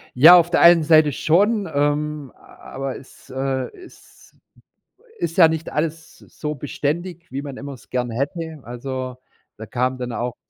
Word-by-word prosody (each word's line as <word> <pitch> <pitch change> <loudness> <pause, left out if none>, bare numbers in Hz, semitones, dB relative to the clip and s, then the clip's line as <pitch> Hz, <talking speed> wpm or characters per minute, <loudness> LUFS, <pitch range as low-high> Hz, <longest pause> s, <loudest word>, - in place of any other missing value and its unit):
Ja, 160 +8 +9
auf 170 0 +3
der - - +2
einen 170 -2 +7
Seite 155 -1 +5
schon, 200 - +1
ähm, 145 -1 -1
a - - -19 0.2
aber 135 -1 -4
es, 135 - -17
äh, 130 -1 -2
ist 365 - -18 0.8
ist 165 - -3
ja 165 -3 +7
nicht 160 0 -3
alles 160 +1 -3
so 150 -1 -7
beständig, 170 +5 -4
wie 135 +2 -4
man 140 -2 -8
immer 140 0 -7
es 125 - -16
gern 125 -1 -2
hätte. 150 +6 -4
Also, 130 +1 -6 0.4
da 110 - -8
kam 130 +3 -1
dann 125 -1 -5
auch 120 0 -3
145 Hz, 165 wpm, -21 LUFS, 130-165 Hz, 0.8 s, Ja